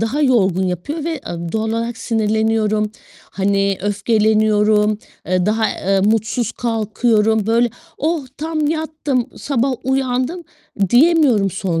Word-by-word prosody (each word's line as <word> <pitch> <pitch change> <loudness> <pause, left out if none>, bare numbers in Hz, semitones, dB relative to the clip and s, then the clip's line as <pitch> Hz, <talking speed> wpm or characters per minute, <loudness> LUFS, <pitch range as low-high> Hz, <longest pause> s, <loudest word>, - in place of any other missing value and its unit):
daha 225 +7 -1
yorgun 195 - +2
yapıyor 290 - -4
ve, 335 - -1
eee, 170 - -6
doğal 220 0 -1
olarak 230 +1 -2
sinirleniyorum. 220 -1 0 0.4
Hani, 195 0 0
öfkeleniyorum. 210 0 +2 0.3
Eee, 185 +1 +1
daha, 220 +1 +1
eee, 195 +1 0
mutsuz 220 +3 0
kalkıyorum. 220 -1 +1
Böyle, 230 +1 +2 0.3
oh 310 -2 -1
tam 310 -1 -2
yattım, 310 -5 -1
sabah 270 -1 0
uyandım, 265 +5 -1 0.5
diyemiyorum 260 - +4
son 180 -3 -2
220 Hz, 115 wpm, -18 LUFS, 210-260 Hz, 0.5 s, diyemiyorum